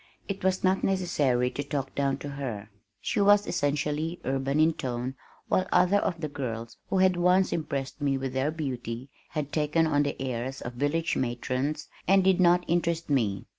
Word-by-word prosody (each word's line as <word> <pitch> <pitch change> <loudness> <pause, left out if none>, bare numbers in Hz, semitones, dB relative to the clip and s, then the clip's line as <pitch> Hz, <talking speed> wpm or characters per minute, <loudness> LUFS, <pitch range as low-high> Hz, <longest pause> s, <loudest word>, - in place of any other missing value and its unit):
It 200 -2 -4
was 190 0 +1
not 190 +1 +2
necessary 145 -10 +1
to 145 - -3
talk 140 -2 -3
down 140 -1 0
to - - -4
her. 120 -7 -5 0.3
She 205 - 0
was 205 0 +5
essentially 150 +3 -1
urban 135 +2 0
in 160 +1 +5
tone 125 -2 -3 0.3
while 185 - +1
other 185 +3 +4
of 170 -4 -2
the 155 - -1
girls 115 -5 -5
who 195 - +1
had 185 -1 +4
once 180 +2 +3
impressed 140 -3 -3
me 140 -2 +1
with 135 -1 -4
their 135 +3 +1
beauty 130 -5 -4 0.2
had 150 -2 -3
taken 155 +1 +2
on 145 -2 +2
the 145 -1 -2
airs 130 0 -3
of 120 - -5
village 145 +6 0
matrons 130 +4 -2 0.2
and 195 +1 +5
did 190 -1 +4
not 175 0 +4
interest 170 -2 0
me. 110 -8 +1
145 Hz, 180 wpm, -28 LUFS, 130-175 Hz, 0.3 s, was